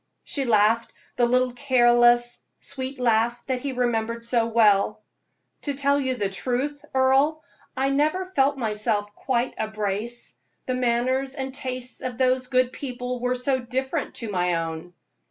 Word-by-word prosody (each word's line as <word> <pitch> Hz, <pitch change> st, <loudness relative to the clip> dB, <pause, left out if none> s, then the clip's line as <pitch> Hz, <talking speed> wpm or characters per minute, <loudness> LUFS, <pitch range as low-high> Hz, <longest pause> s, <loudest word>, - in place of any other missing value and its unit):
She 275 Hz, -2 st, -2 dB
laughed 225 Hz, 0 st, +3 dB, 0.2 s
the 240 Hz, -, +3 dB
little, 250 Hz, 0 st, +2 dB
careless, 240 Hz, -2 st, +4 dB, 0.2 s
sweet 265 Hz, 0 st, -6 dB
laugh 240 Hz, 0 st, +1 dB
that 255 Hz, -2 st, -2 dB
he 280 Hz, -, -3 dB
remembered 230 Hz, -2 st, -1 dB
so 235 Hz, -1 st, +1 dB
well. 215 Hz, -2 st, +3 dB, 0.6 s
"To 285 Hz, -2 st, -2 dB
tell 280 Hz, +1 st, +2 dB
the 260 Hz, -2 st, -1 dB
plain 200 Hz, -3 st, -1 dB
truth, 265 Hz, +7 st, -2 dB
Earle, 270 Hz, +4 st, +3 dB, 0.3 s
I 270 Hz, +1 st, +1 dB
never 310 Hz, +7 st, +1 dB
felt 285 Hz, -6 st, +1 dB
myself 210 Hz, -3 st, -1 dB
quite 245 Hz, +2 st, -1 dB
a 220 Hz, -, 0 dB
Brace 215 Hz, -, -2 dB, 0.3 s
the 255 Hz, -, -1 dB
manners 255 Hz, +2 st, 0 dB
and 265 Hz, -1 st, -4 dB
tastes 255 Hz, -2 st, -4 dB
of 250 Hz, -2 st, -4 dB
those 255 Hz, 0 st, +2 dB
good 255 Hz, -1 st, +1 dB
people 250 Hz, -2 st, -5 dB
were 250 Hz, +1 st, 0 dB
so 260 Hz, +1 st, 0 dB
different 265 Hz, +4 st, -3 dB
to 230 Hz, -3 st, -4 dB
my 180 Hz, -2 st, +1 dB
own." 165 Hz, +1 st, -5 dB
250 Hz, 155 wpm, -24 LUFS, 230-265 Hz, 0.6 s, careless